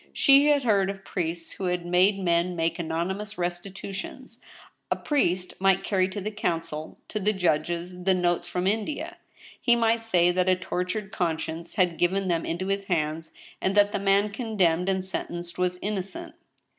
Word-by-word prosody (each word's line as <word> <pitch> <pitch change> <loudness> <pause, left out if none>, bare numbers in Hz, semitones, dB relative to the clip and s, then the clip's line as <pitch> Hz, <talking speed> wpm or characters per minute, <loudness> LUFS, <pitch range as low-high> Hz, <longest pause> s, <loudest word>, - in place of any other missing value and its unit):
She 275 +1 +6
had 290 -2 +4
heard 200 -5 +3
of 195 -1 -6
priests 170 -2 -3
who 190 - -5
had 180 -1 -1
made 180 +3 +4
men 175 -1 +1
make 165 +1 -1
anonymous 185 +6 -3
restitu 180 +2 -4
tions. 235 +5 -8 0.5
A - - +2
priest 185 - 0
might 195 -1 +3
carry 190 -2 +1
to 190 - -5
the 210 +2 -4
counsel, 165 -7 -3
to 215 - -3
the 210 +2 +1
judges, 175 0 -1
the 190 0 +3
notes 175 -1 0
from 180 +1 -2
India. 225 - -2 0.4
He 240 - +4
might 230 0 +2
say 180 -6 +3
that 185 +1 +1
a 185 - +5
tortured 185 +2 -3
conscience 165 -1 -3
had 180 -4 +1
given 190 +2 +1
tliem 165 -1 0
into 175 +3 -2
his 195 0 -1
hands, 160 -3 -1 0.3
and 190 +1 0
that 205 0 +5
the 205 - -1
man 200 +1 +3
condemned 195 -6 +1
and 190 -1 0
sentenced 175 -2 -5
was 180 0 0
innocent. 210 - -4
185 Hz, 175 wpm, -26 LUFS, 175-205 Hz, 0.5 s, She